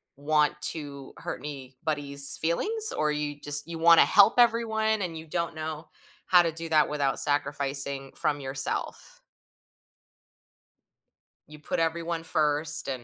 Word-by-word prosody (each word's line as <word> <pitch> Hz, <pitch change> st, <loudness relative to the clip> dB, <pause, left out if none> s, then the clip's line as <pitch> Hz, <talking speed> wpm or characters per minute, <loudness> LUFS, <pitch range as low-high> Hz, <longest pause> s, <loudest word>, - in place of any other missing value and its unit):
want 150 Hz, +1 st, 0 dB
to 140 Hz, -4 st, -5 dB
hurt -, -, -7 dB
anybody's 140 Hz, 0 st, +1 dB
feelings? 425 Hz, -, +2 dB
Or, 150 Hz, 0 st, -1 dB
you 145 Hz, -1 st, -5 dB
just 145 Hz, +2 st, +4 dB
you 165 Hz, -1 st, -8 dB
wanna 165 Hz, 0 st, +5 dB
help 205 Hz, +2 st, +4 dB
everyone 220 Hz, -2 st, 0 dB
and 165 Hz, -3 st, -5 dB
you 160 Hz, 0 st, -11 dB
don't 170 Hz, +1 st, -4 dB
know 155 Hz, 0 st, -8 dB, 0.4 s
how 180 Hz, -1 st, +5 dB
to 165 Hz, -, -2 dB
do 165 Hz, +1 st, -6 dB
that 155 Hz, -1 st, +2 dB
without 145 Hz, -2 st, -1 dB
sacrificing 140 Hz, -1 st, +1 dB
from 145 Hz, -1 st, -2 dB
yourself? 135 Hz, -1 st, -1 dB, 2.3 s
You 150 Hz, 0 st, -15 dB
put 150 Hz, -, -5 dB
everyone 165 Hz, 0 st, -3 dB
first 150 Hz, -1 st, +1 dB
and 130 Hz, -3 st, -6 dB
150 Hz, 135 wpm, -25 LUFS, 145-165 Hz, 2.3 s, wanna